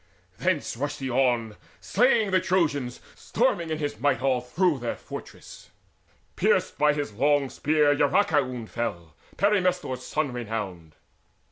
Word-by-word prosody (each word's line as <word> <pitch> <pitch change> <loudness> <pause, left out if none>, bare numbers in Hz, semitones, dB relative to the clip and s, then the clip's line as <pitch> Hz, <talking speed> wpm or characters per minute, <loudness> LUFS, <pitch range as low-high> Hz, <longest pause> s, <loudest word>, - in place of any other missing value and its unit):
Thence - - 0
rushed 145 +4 -3
he 135 -1 -3
on 120 -4 +1 0.2
Slaying 225 -2 +2
the 185 - +4
Trojans, 165 -9 0
storming 200 -9 0
in 155 - -1
his 145 -7 -4
might 130 -1 +2
All 130 -1 +1
through 150 +5 +1
their 120 -1 -3
fortress: - - -10 0.7
pierced - - +1
by 150 0 +4
his 145 -7 -3
long 140 +3 +2
spear 150 -1 +2
Eurycoon 145 - +1
fell, 90 -10 -4 0.2
Perimnestor's 180 -10 +1
son 150 -4 -2
renowned. 105 -9 -5
140 Hz, 130 wpm, -26 LUFS, 120-165 Hz, 0.7 s, the